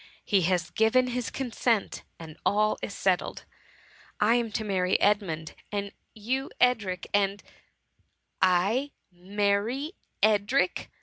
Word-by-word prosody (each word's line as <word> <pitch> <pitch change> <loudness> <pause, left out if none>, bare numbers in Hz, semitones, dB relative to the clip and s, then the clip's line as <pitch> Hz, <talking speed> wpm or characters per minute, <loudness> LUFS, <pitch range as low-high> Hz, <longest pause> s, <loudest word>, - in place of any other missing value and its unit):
He 200 -3 +3
has 175 -2 0
given 250 +3 +3
his 250 -1 -2
consent, 235 -4 -1 0.2
and 160 -2 -10
all 215 +1 +2
is 200 - -5
settled. 185 -2 0 0.7
I 215 +2 +4
am 235 -2 0
to 220 - -1
marry 185 -3 +1
Edmund, 180 -7 +1 0.2
and 200 -1 -3 0.2
you 255 +5 -2
Edric, 205 -7 +2
and——" 200 0 +1 0.6
'' - - -48
I 195 +10 +2 0.2
marry 205 - -1 0.3
Edric 215 - +3 0.2
!" - - -36
205 Hz, 125 wpm, -27 LUFS, 190-235 Hz, 0.7 s, I